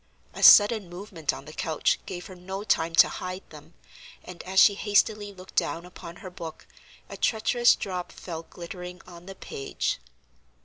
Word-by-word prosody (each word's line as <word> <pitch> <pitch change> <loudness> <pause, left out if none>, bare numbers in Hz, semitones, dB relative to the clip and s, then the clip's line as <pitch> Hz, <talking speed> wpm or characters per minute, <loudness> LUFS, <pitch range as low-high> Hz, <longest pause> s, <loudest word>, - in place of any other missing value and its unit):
A - - -8
sudden 205 -3 +7
movement 175 -3 -4
on - - -9
the 155 - -11
couch 160 -1 0
gave 180 -1 -6
her 185 - -10
no 190 +2 -7
time 165 -5 +1
to - - +8
hide 185 +1 -6
them, - - -14 0.5
and 180 -1 -10
as 190 +1 +1
she 205 - +7
hastily 205 0 +1
looked 185 -1 -14
down 170 +1 0
upon 170 -1 -11
her 185 +1 -10
book 165 -3 -9 0.4
a - - -9
treacherous 240 +2 +3
drop 180 -2 -5
fell 165 -3 -7
glittering 180 +1 -9
on 175 0 -13
the 195 - -8
page. 135 - -4
180 Hz, 170 wpm, -26 LUFS, 170-200 Hz, 0.5 s, to